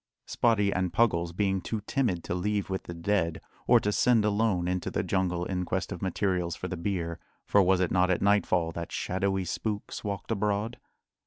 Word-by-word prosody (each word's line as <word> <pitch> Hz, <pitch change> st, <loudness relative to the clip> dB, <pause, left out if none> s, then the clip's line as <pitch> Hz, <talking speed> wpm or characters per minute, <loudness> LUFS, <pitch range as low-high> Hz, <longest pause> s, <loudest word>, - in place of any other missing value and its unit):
Spottie 105 Hz, -4 st, +2 dB
and 90 Hz, -1 st, 0 dB
Puggles 85 Hz, -8 st, +2 dB
being 95 Hz, +1 st, 0 dB
too 110 Hz, +2 st, -3 dB
timid 105 Hz, -6 st, -1 dB
to -, -, -3 dB
leave 100 Hz, +2 st, -1 dB
with 95 Hz, -, -3 dB
the 85 Hz, -, -6 dB
dead, 85 Hz, -2 st, 0 dB, 0.3 s
or -, -, +7 dB
to 105 Hz, -, 0 dB
send 115 Hz, 0 st, +3 dB
alone 100 Hz, -4 st, +1 dB
into 90 Hz, 0 st, -1 dB
the -, -, -1 dB
jungle 90 Hz, -2 st, 0 dB
in 90 Hz, -1 st, -2 dB
quest 95 Hz, +1 st, -2 dB
of 90 Hz, -, -5 dB
materials 90 Hz, -3 st, -1 dB
for 90 Hz, -, -5 dB
the 95 Hz, -, -4 dB
bier 85 Hz, -2 st, -3 dB, 0.3 s
for 100 Hz, -, +4 dB
was 95 Hz, 0 st, +3 dB
it 90 Hz, -, +1 dB
not 90 Hz, 0 st, +3 dB
at 90 Hz, -, +2 dB
nightfall 95 Hz, -4 st, +2 dB
that 85 Hz, 0 st, -6 dB
shadowy 95 Hz, 0 st, -1 dB
spooks 105 Hz, +3 st, -4 dB
walked 100 Hz, +1 st, -4 dB
abroad? 105 Hz, +2 st, -1 dB
95 Hz, 190 wpm, -28 LUFS, 90-105 Hz, 0.3 s, or